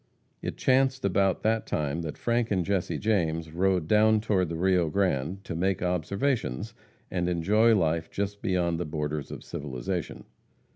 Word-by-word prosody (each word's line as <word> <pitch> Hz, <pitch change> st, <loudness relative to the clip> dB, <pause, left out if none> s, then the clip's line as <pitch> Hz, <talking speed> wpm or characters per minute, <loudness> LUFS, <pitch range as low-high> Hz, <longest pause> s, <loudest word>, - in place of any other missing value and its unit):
It -, -, -4 dB
chanced 130 Hz, -2 st, +2 dB
about 95 Hz, 0 st, +1 dB
that 110 Hz, +1 st, +1 dB
time 75 Hz, +2 st, -1 dB
that 80 Hz, -2 st, -5 dB
Frank 120 Hz, -1 st, 0 dB
and 95 Hz, -4 st, 0 dB
Jesse 100 Hz, -3 st, -1 dB
James 85 Hz, -7 st, 0 dB
rode 90 Hz, -1 st, +1 dB
down 110 Hz, +2 st, +4 dB
toward 100 Hz, -5 st, +1 dB
the 85 Hz, -, -3 dB
Rio 90 Hz, -1 st, +2 dB
Grande 90 Hz, 0 st, 0 dB
to -, -, -5 dB
make 95 Hz, +2 st, 0 dB
observations, 90 Hz, -, -1 dB, 0.4 s
and 90 Hz, -1 st, 0 dB
enjoy 105 Hz, +7 st, +3 dB
life 80 Hz, -3 st, 0 dB
just 100 Hz, 0 st, -3 dB
beyond 90 Hz, -5 st, 0 dB
the 90 Hz, -, -2 dB
borders 75 Hz, -1 st, -3 dB
of -, -, -8 dB
civilization. 65 Hz, -4 st, -4 dB
90 Hz, 155 wpm, -27 LUFS, 80-105 Hz, 0.4 s, down